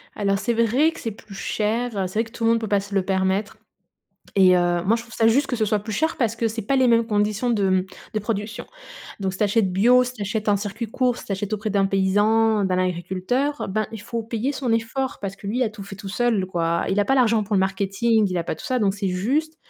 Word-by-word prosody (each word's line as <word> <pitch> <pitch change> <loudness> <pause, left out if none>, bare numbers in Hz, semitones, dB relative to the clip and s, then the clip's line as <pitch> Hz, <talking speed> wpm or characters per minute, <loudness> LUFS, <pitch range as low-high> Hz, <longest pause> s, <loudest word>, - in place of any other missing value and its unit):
Alors 195 -1 0
c'est 220 +4 0
vrai 235 +8 +3
que - - -11
c'est 225 - -4
plus 200 -1 -13
cher, 225 +4 -1
heu, 190 -1 0
c'est 185 - -11
vrai - - +3
que 225 - -13
tout 230 - -7
le 225 - +5
monde 230 - +2
peut 220 - -4
pas 205 0 +2
se 200 +1 -7
le 195 - +2
permettre 190 +3 -1 0.8
et 185 -2 +6
heu, 175 -1 +1
moi 215 +4 +4
je 230 - -4
trouve 235 -1 -14
ça 225 0 +3
juste 270 +5 +3
que 250 - -1
ce 220 - +1
soit 210 0 +1
plus 215 +2 -7
cher 320 +7 0
parce 230 -3 0
que 230 - +1
c'est 225 +1 -4
pas 270 +7 0
les 260 -1 +4
mêmes 230 -1 +4
conditions 210 +2 0
de, 205 -5 +2
mmh, 185 0 +2 0.3
de 215 - 0
production. 215 +2 -4 0.6
Donc 190 -1 -1
si 190 - -8
tu - - +3
achètes 205 -2 +1
bio, 240 +7 +5
si 250 - -5
tu 215 - -6
achètes 210 +2 -2
en 205 - +4
circuit 205 +3 -4
court, 245 +2 0
si - - -11
tu - - -3
achètes 200 +2 -3
auprès 215 +1 -2
d'un 200 -1 +2
paysan, 205 +3 +2
d'un 185 -1 0
agriculteur, 185 +11 -1
ben, 215 +2 -1
il 225 - -7
faut 230 +2 -4
payer 230 +4 -2
son 260 -4 -2
effort 230 +4 -1
parce 195 -1 -5
que 200 - -11
lui 235 +6 0
a 230 - 0
tout 210 -2 -10
fait 195 0 -9
tout 195 0 -8
seul, 215 -2 +1
quoi. 170 -2 0
Il 195 - 0
a - - +2
pas 270 - +2
l'argent 230 -4 +3
pour 205 +1 -2
le 195 - +4
marketing, 200 +3 +1
il 180 - -3
a 170 - -1
pas - - -3
tout - - -11
ça, 255 -3 0
donc 195 -2 +2
c'est 200 -1 -2
juste. 275 +13 -1
215 Hz, 275 wpm, -23 LUFS, 195-230 Hz, 0.8 s, et